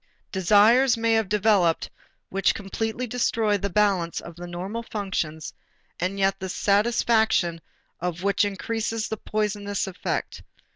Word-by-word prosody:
Desires 215 +7 +5
may 230 0 +2
have 220 -3 +1
developed 205 -5 +2 0.4
which 195 0 +1
completely 220 +4 -3
destroy 225 -3 +1
the 200 0 -2
balance 195 -6 +1
of 170 - -10
the 175 +1 -8
normal 185 +6 -5
functions 190 -8 -4 0.5
and 185 +3 -2
yet 195 0 +1
the 190 -1 -5
satisfaction 205 -4 +2 0.4
of 175 0 -3
which 200 +2 +2
increases 220 +2 -2
the 220 - -3
poisoning 210 -1 -2
effect. 195 -2 -3
205 Hz, 130 wpm, -25 LUFS, 185-220 Hz, 0.5 s, Desires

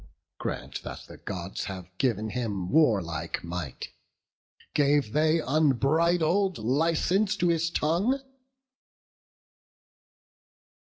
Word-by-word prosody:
Grant - - -4
that - - -7
the - - -11
Gods 95 -1 -5
have 95 -2 -8
giv'n 110 -4 0
him 105 -7 -3
warlike 95 - +1
might, 85 -6 -5 0.8
Gave 145 -5 +2
they 155 +2 +3
unbridled 160 - +2
license 165 - +1
to 175 -2 +2
his 165 0 +1
tongue?" 175 - +1
145 Hz, 90 wpm, -27 LUFS, 100-165 Hz, 0.8 s, they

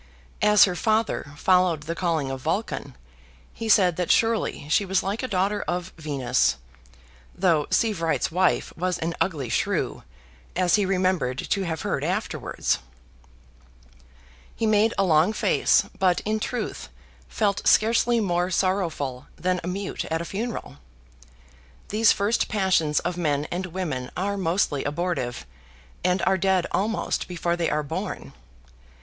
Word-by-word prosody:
As 210 0 +6
her 185 - +3
father 215 -8 0
followed 180 -3 +3
the 165 +2 -3
calling 165 -6 -1
of 135 -1 -5
Vulcan, 170 - -3 0.6
he 225 -1 -5
said 185 -5 +5
that 180 -2 -2
surely 225 -9 +1
she 165 +6 +3
was 190 -1 0
like 200 +4 -2
a 255 - -2
daughter 200 0 0
of 180 +1 -3
Venus, 135 - +1 0.8
though 165 -6 +2
Sievewright's 185 -10 +1
wife 185 +2 +1
was 180 +1 -1
an 165 +1 -2
ugly 150 -9 0
shrew, - - -1 0.5
as 180 -1 +2
he 205 -3 +3
remembered 185 -9 0
to 195 - -1
have 160 -2 -3
heard - - -1
afterwards. - - -1 1.8
He 225 - -1
made 215 +1 +3
a 195 - +3
long 170 +3 +3
face, - - +3 0.2
but, 185 -2 +3
in 215 +1 -1
truth, 245 +3 -4 0.4
felt 205 -3 0
scarcely 230 +2 +4
more 180 -3 0
sorrowful 165 -9 -1
than 180 +2 -1
a - - -5
mute 195 +2 -3
at 160 - -2
a 170 - -4
funeral. 200 - -5 1.1
These 220 +1 +4
first 205 +4 +1
passions 185 -8 +1
of 175 0 -3
men 150 -4 0
and 185 +2 -2
women 160 -9 -4
are 200 +3 -1
mostly 170 -6 0
abortive; 145 - -2 0.6
and 180 +1 +1
are 190 0 +2
dead 190 -1 +2
almost 210 +3 -1
before 175 -1 -1
they 170 -1 0
are 150 - 0
born. 140 - -5
180 Hz, 145 wpm, -25 LUFS, 160-200 Hz, 1.8 s, As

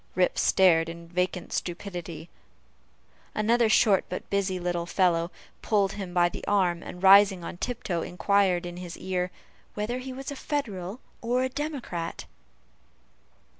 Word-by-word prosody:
Rip 180 0 +2
stared 165 -3 +4
in 170 0 -9
vacant 180 0 -2
stupidity. 175 -3 -5 1.1
Another 230 +2 +3
short 210 -3 +4
but 180 - -5
busy 195 -2 0
little 175 -1 -2
fellow 170 -2 +2 0.3
pulled 200 -3 +2
him 195 -4 -6
by 175 -1 +4
the - - -7
arm, 180 -4 +2
and 180 - -9
rising 195 -1 +7
on 175 - -6
tiptoe, 210 -7 -2
inquired 185 0 +1
in 175 0 -6
his 180 -2 -7
ear, 180 -1 -2 0.5
"whether 220 +4 -2
he 260 +1 -6
was 270 +2 -6
Federal 235 - -4 0.2
or 250 +2 +1
Democrat." 260 - -4
185 Hz, 130 wpm, -27 LUFS, 175-215 Hz, 1.1 s, rising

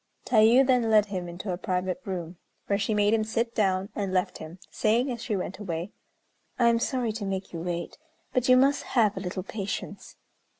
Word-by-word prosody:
Tayû 235 +3 +5
then 250 -3 +2
led 215 -2 +5
him 185 -4 -5
into 180 +2 -5
a 175 - -5
private 185 +5 -2
room, 175 -3 -5 0.3
where 200 0 0
she 215 0 0
made 205 +1 +3
him 220 -1 +2
sit 230 +2 -1
down, 195 -2 +1
and 200 -3 -2
left 185 -1 0
him, 160 +3 -9
saying, 235 +5 +1
as 235 -2 -5
she 220 -4 -2
went 185 0 -4
away, 175 -1 -4 0.7
"I 235 -1 +4
am 230 0 +2
sorry 245 -2 -1
to 215 0 -5
make 195 -1 -4
you 165 - -4
wait, 175 +6 -4 0.3
but 255 0 +1
you 255 - +8
must 275 +2 +3 0.2
have 215 -3 +4
a - - -4
little 185 0 -4
patience." 200 0 -6
205 Hz, 205 wpm, -27 LUFS, 185-230 Hz, 0.7 s, you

